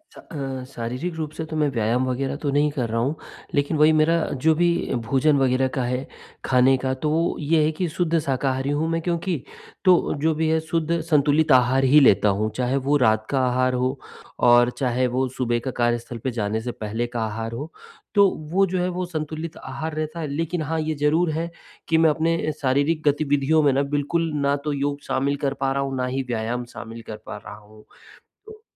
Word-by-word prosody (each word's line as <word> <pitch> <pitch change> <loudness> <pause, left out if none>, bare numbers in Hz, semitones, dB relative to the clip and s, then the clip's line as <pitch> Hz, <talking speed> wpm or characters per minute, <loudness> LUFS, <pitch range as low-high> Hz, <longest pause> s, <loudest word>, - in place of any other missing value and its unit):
स - - -14
अ, 135 -4 -6
शारीरिक 125 +9 -4
रूप 155 -2 -4
से 160 - -3
तो 155 0 -7
मैं 150 -1 +2
व्यायाम 120 +1 0
वग़ैरह 135 +2 -2
तो 145 - 0
नहीं 145 +2 +2
कर 125 -6 -2
रहा 115 +1 -1
हूँ, 135 +6 0 0.4
लेकिन 145 +2 +1
वही 150 +1 +6
मेरा 155 +2 +3 0.3
जो 160 - +5
भी 175 +1 +3 0.4
भोजन 140 +3 +3
वग़ैरह 130 0 +2
का 130 - +1
है, 125 +2 -2 0.4
खाने 130 +1 +4
का, 130 0 0
तो 130 +3 -2
वो 165 +3 +1
ये 155 +1 +2
है 155 - +2
कि 180 - +1
शुद्ध 170 -2 +1
शाकारी 135 -1 -1
हूँ 150 +3 0
मैं 165 0 -1
क्योंकि, 170 0 -1 0.5
तो 180 -2 +4
जो 160 +1 +2
भी 160 +1 0
है 160 - +2
शुद्ध 165 +1 -1
संतुलित 150 -1 +2
आहार 130 +1 +4
ही 140 +3 +6
लेता 105 -6 +5
हूँ, 110 +1 0
चाहे 125 +1 0
वो 145 - +4
रात 110 -4 +2
का 135 - +1
आहार 130 +1 +1
हो 130 +2 0 0.5
और 120 0 +6
चाहे 125 -1 +1
वो 130 - +2
सुबह 120 -2 0
का 130 - -1
कार्यस्थल 120 0 0
पे 130 - -1
जाने 105 +1 -1
से 120 - -4
पहले 110 +2 -3
का 120 -1 -4
आहार 115 +1 -4
हो, 145 +7 -6 0.4
तो 200 -1 +6 0.2
वो 195 +2 +4
जो 185 0 -2
है 180 - 0
वो 180 0 -3
संतुलित 160 -1 -5
आहार 160 0 -6
रहता 155 +2 -4
है। 160 - -3
लेकिन 165 +4 -2
हाँ, 160 +2 -2
ये 155 0 -2
ज़रूर 155 +3 +2
है 165 +2 -2 0.4
कि 160 - +3
मैं 160 0 +5
अपने 165 +1 0
शारीरिक 145 +4 +1
गतिविधियों 145 +1 +2
में 145 - +4
ना, 140 - +2
बिल्कुल 145 +4 -1
ना 140 0 +3
तो 150 - 0
योग 145 +1 -2
शामिल 140 +2 0
कर 135 - +1
पा 135 - +1
रहा 140 0 0
हूँ, 135 -1 -3
ना 125 - 0
ही 130 +1 -2
व्यायाम 120 +1 -2
शामिल 115 0 -8
कर 110 - -6
पा - - -6
रहा 105 - -10
हूँ। 105 0 -17 0.6
तो 435 0 -13
140 Hz, 215 wpm, -23 LUFS, 125-160 Hz, 0.6 s, वही